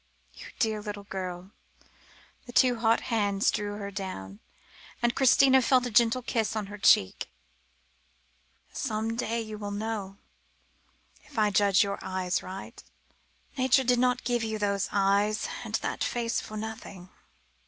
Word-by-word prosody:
"You - - -11
dear 220 -2 0
little 205 -1 -6
girl," 185 -1 -6 1.0
the - - -8
two 245 -1 +3
hot 225 0 +3
hands 205 -2 +2
drew 205 -1 -3
her 200 -1 -6
down, 110 - -6 0.6
and 240 0 +1
Christina 265 0 +5
felt 255 0 +3
a 245 - -3
gentle 235 +3 +3
kiss 225 -3 -1
on 215 -2 -2
her 210 - -8
cheek; 95 - +3 1.4
"some 225 -2 -2
day 230 0 -1
you 215 -1 -7
will 205 -1 -5
know, 205 -2 -4 1.1
if - - -16
I 210 -1 +3
judge 200 0 +4
your 200 0 -3
eyes 185 -1 -2
aright. 190 +1 -9 0.8
Nature 260 +1 +4
did 245 -1 +2
not 250 0 +2
give 240 -1 0
you 220 -1 -2
those 200 -2 0
eyes, 205 +2 +2 0.2
and - - -3
that - - -2
face 235 -2 -1
for 215 - -8
nothing. 210 -4 -7
215 Hz, 145 wpm, -28 LUFS, 200-235 Hz, 1.4 s, Christina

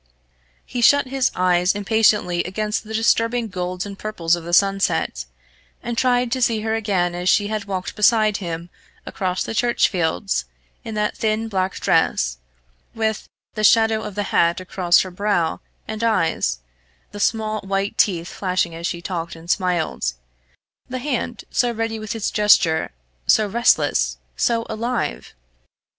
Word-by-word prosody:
He 245 - -4
shut 285 +4 +5
his 270 -1 +1
eyes 180 +1 +2
impatiently 205 -4 +2
against 210 +4 -2
the 220 0 -9
disturbing 230 +1 +1
golds 180 0 -4
and 200 -1 -8
purples 175 -6 0
of 170 - -8
the 170 - -6
sunset, 195 - +2 0.6
and 240 0 -3
tried 245 0 +2
to 260 +1 -1
see 230 -3 +2
her 220 0 -1
again 195 -6 0
as 180 +1 -1
she 205 -1 +3
had 215 -2 -3
walked 190 -2 -4
beside 215 -1 +3
him 170 -2 -6 0.3
across 185 -1 -2
the - - -5
church 240 +1 +2
fields, 180 - -1 0.4
in 220 - -6
that 210 0 -1
thin 220 0 0
black 190 -2 -1
dress, - - +1 0.6
with, 220 -1 -2 0.2
the 215 - -3
shadow 220 0 +4
of 205 - -7
the 205 - -1
hat 170 +1 +3
across 180 -1 +2
her 185 - -5
brow 180 -3 0 0.3
and 220 +1 -4
eyes 160 - +1 0.5
the 205 - -8
small 215 0 0
white 195 +1 -2
teeth 175 -4 +2
flashing 180 -3 -1
as 165 +1 -4
she 170 0 -5
talked 170 -1 -4
and 165 +2 -4
smiled, 175 - 0 0.8
the 255 - -3
hand 250 -2 -3
so 245 -1 +2
ready 225 -1 -3
with 215 +2 -5
its 220 - -2
gesture, 180 -6 +3 0.4
so 215 - +5
restless, 235 +4 +2 0.2
so 230 -1 +1
alive! 230 +2 -3
205 Hz, 155 wpm, -21 LUFS, 180-225 Hz, 0.8 s, shut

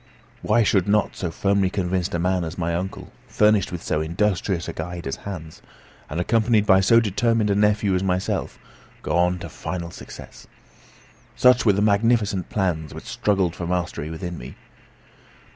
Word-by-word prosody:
Why 120 - +3
should 100 -3 +2
not 105 0 +1
so 90 - -3
firmly 100 +2 +1
convinced 90 -2 -1
a - - +1
man 90 +1 0
as 80 +2 -6
my 85 -1 -1
uncle, 90 +3 -5 0.2
furnished 105 -2 +2
with 90 -2 -6
so 75 - -1
industrious 90 +1 -1
a - - -4
guide 85 +1 -6
as 70 - -3
Hans, 80 -5 -7 0.5
and 80 - -3
accompanied 110 +2 +2
by 95 -2 +5
so 115 +4 +5
determined 115 0 +1
a - - +2
nephew 105 -1 +2
as 90 - +1
myself, 95 -1 -1 0.5
go - - -1
on 90 +1 +2
to 85 - -7
final 85 +2 -6
success? - - -12 0.9
Such 125 -2 +4
were 105 - +6
the 100 +1 +1
magnificent 105 -2 +2
plans 85 -6 -2
which - - -9
struggled 95 -5 0
for 85 - -5
mastery 85 -4 -2
within 85 +1 -6
me. 60 +2 -9
95 Hz, 170 wpm, -23 LUFS, 85-105 Hz, 0.9 s, were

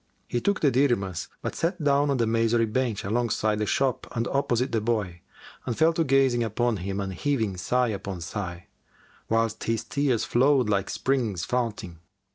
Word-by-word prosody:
He 120 - -1
took 200 0 0
the 145 - +4
dirhams, 120 -9 +1 0.2
but - - -2
sat 170 0 -2
down 145 0 +3
on 140 - +1
the 115 - +2
masonry 115 +1 +2
bench 115 -1 -1
alongside 110 0 0
the 105 - -1
shop 135 +2 0
and 115 0 0
opposite 130 -2 0
the 115 -2 0
boy 105 -6 -2 0.4
and 120 - -3
fell 165 +1 +4
to 165 - +1
gazing 135 -4 +3
upon 115 +1 0
him 95 +2 -4
and 95 -1 -3
heaving 110 -3 -1
sigh 125 +7 +1
upon 100 -3 -4
sigh, 90 0 -5 0.6
whilst 115 0 0
his 115 -1 0
tears 140 -5 0
flowed 130 0 +3
like 100 -2 0
springs 120 -10 -1
founting. 110 -9 -3
115 Hz, 175 wpm, -26 LUFS, 105-130 Hz, 0.6 s, the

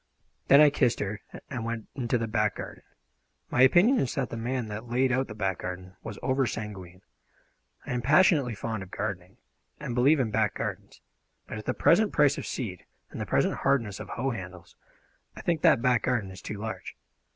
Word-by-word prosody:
Then 140 +2 +8
I 150 -1 +7
kissed 130 -4 +1
her 105 +1 -3 0.3
and 125 -4 -3
went 115 -1 -4
into 125 -2 0
the 115 - -1
back 105 -2 0
garden. - - -8 0.7
My 125 - +2
opinion 180 - +6
is 130 - -1
that 135 -3 -2
the - - -4
man 120 +2 -2
that 110 +2 -7
laid 130 +2 +2
out 130 +1 +1
that 110 - -8
back 95 -4 -1
garden 90 +1 -7
was 110 -3 -7
over 130 -1 +1
sanguine. 95 -5 -7 0.8
I - - -3
am 125 - -1
passionately 145 - +4
fond 110 +1 -4
of 95 - -9
gardening, 95 -3 -5 0.4
and 140 -5 -4
believe 135 +5 +4
in 120 -4 0
back 110 -1 +1
gardens; - - -5 0.4
but 110 - -6
at 110 - -10
the 130 - -1
present 210 +4 +4
price 145 -1 +3
of - - -6
seed 100 -9 -5 0.3
and - - -6
the - - -4
present - - +1
hardness 115 -8 0
of - - -8
hoe 135 - -2
handles, 90 -5 -8 0.6
I - - -8
think 170 -3 0
that 115 - +4
back 125 -3 +3
garden 110 -6 -1
is 95 - -11
too 105 - -6
large. 110 +2 -6
115 Hz, 200 wpm, -28 LUFS, 105-130 Hz, 0.8 s, Then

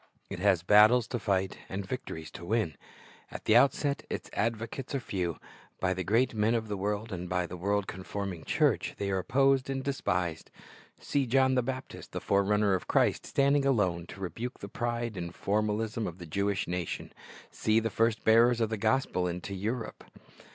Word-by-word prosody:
It - - -4
has 95 -3 +3
battles 105 +5 +6
to 120 - -2
fight 95 -3 -1
and 95 +1 -4
victories 85 -8 -6
to - - -9
win. 100 - 0 0.5
At - - -9
the 110 - +4
outset 140 +3 +3
its - - -5
advocates 115 +5 -2
are - - +1
few. 90 -8 -3 0.4
By 95 0 +1
the 95 0 -3
great 115 +7 +2
men 110 +2 +2
of 110 -2 -2
the 105 - -1
world 105 +3 -2
and 90 0 -5
by 90 0 0
a 90 - -7
world 100 +3 0
conforming 95 -1 -5
church, - - +1
they 100 -1 -2
are 95 - +1
opposed 135 +6 +2
and 135 -1 -2
despised. 90 - -2 0.5
See 140 -2 0
John 130 +2 +3
the 130 - +3
Baptist, 130 +1 -6
the - - -2
forerunner 100 0 +2
of 95 - -2
Christ, - - +2
standing 140 +1 +3
alone 95 -11 +1
to - - -10
rebuke 115 +7 -5
the 100 - -7
pride 120 +1 -3
and 85 -1 -5
formalism 110 +2 -1
of 85 - -7
the 90 - -9
Jewish 100 +4 -1
nation. 90 -1 -4 0.4
See 110 +1 +2
the 115 -1 -2
first 115 +1 +1
bearers 115 +2 +5
of 115 -1 0
the 110 - -1
gospel 110 -5 +1
into 90 +3 -4
Europe. 110 +5 -4
105 Hz, 185 wpm, -30 LUFS, 95-120 Hz, 0.5 s, battles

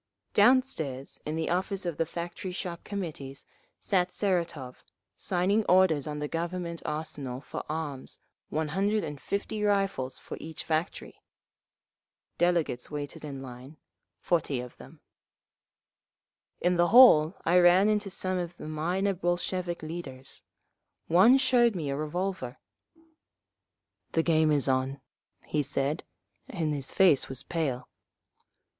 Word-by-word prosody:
Downstairs 205 - +2
in 155 - -2
the 160 0 -1
office 190 +2 -1
of 170 -3 -3
the 165 - 0
Factory 175 +3 -5
Shop 180 -2 -5
Committees 155 -9 -6 0.3
sat 180 -2 +1
Seratov, 170 -11 -1 0.4
signing 195 +4 +1
orders 180 -6 +4
on 150 0 -4
the 150 0 -3
Government 170 +1 -4
Arsenal 145 -4 -3
for - - -6
arms—one 155 0 -5
hundred 200 +5 +1
and 150 -3 -6
fifty 205 +1 -3
rifles 195 -11 0
for - - -8
each 160 0 -7
factory…. 160 +3 -3 1.2
Delegates 170 -8 +1
waited 145 -1 -6
in 135 -3 -6
line, 130 +4 -10 0.4
forty 150 -6 0
of 125 0 -8
them…. - - -14 1.6
In 180 0 +2
the 175 0 +4
hall 195 -8 +8
I 175 +2 +5
ran 180 +3 +6
into 210 -1 +1
some 185 0 -2
of 175 0 -5
the - - -8
minor 175 +6 0
Bolshevik 175 -1 -2
leaders. 145 -5 -7 0.7
One 190 +10 +7
showed 245 -4 +3
me 150 -5 -2
a - - -1
revolver. 155 -3 -3 1.6
"The 165 - +2
game 160 -2 +3
is 145 -2 +3
on," 130 +1 0 0.5
he 150 - 0
said, 140 +2 -2 0.4
and 160 -5 -2
his 140 -2 -3
face 180 -8 +4
was 130 0 -3
pale. 135 -7 -2
165 Hz, 125 wpm, -28 LUFS, 145-185 Hz, 1.6 s, hall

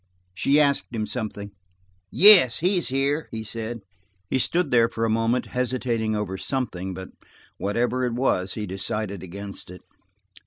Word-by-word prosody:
She 140 - +2
asked 140 -2 +2
him 110 -1 -1
something, 105 -3 -5
for– 100 - -31 0.5
"Yes, 185 - +7
he 185 +3 +2
is - - -2
here," 140 +3 0
he 110 -1 -5
said. 115 +1 -5 0.5
He 130 - +2
stood 175 +7 0
there 115 -1 +4
for 115 - -2
a 110 - +1
moment, 115 +2 +1
hesitating 120 -3 -1
over 95 -3 -3
something, 95 -9 -3
but 95 0 -8 0.5
whatever 120 +5 0
it 125 -2 0
was, 95 -7 0
he 105 - -3
decided 100 0 -3
against 100 +2 -8
it. 90 -1 -11
115 Hz, 160 wpm, -24 LUFS, 100-130 Hz, 0.5 s, Yes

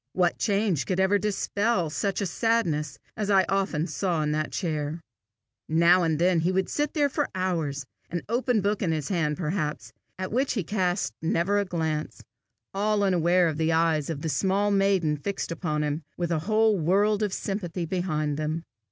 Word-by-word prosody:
What 180 -2 +1
change 200 - +1
could 185 -1 0
ever 190 +2 +3
dispel 205 -3 0
such 195 +4 -1
a - - 0
sadness 170 -9 0 0.2
as 210 -1 -2
I 195 -2 +5
often 190 -5 0
saw 175 -4 -1
in 150 - 0
that 155 0 -1
chair! 155 -3 -2 0.7
Now 170 +3 +5
and 160 -3 +1
then 175 +1 +3
he 170 +3 +1
would 190 0 0
sit 295 +1 -1
there 290 -2 +3
for 290 +1 -1
hours, 160 -7 -1 0.2
an 175 0 -3
open 240 0 +1
book 205 +1 0
in 175 - +1
his 155 -3 -2
hand 155 -6 0
perhaps, 155 -2 -3 0.2
at 185 0 -4
which 260 +5 +1
he 205 - -1
cast 180 - -1
never 170 +5 +1
a 200 - 0
glance, 160 -4 -3 0.5
all 205 +1 +1
unaware 180 -1 +3
of 155 -2 -2
the 160 0 +2
eyes 160 -2 +2
of 150 -3 -4
the 160 - -1
small 195 +7 +1
maiden 195 -6 +2
fixed 195 +3 -4
upon 155 -3 -1
him, 150 +2 -2 0.2
with 175 -1 -2
a 165 - +1
whole 215 -2 +3
world 200 +6 +2
of 210 -2 0
sympathy 185 -3 -3
behind 155 -4 -1
them. 155 +2 -2
180 Hz, 185 wpm, -26 LUFS, 160-200 Hz, 0.7 s, I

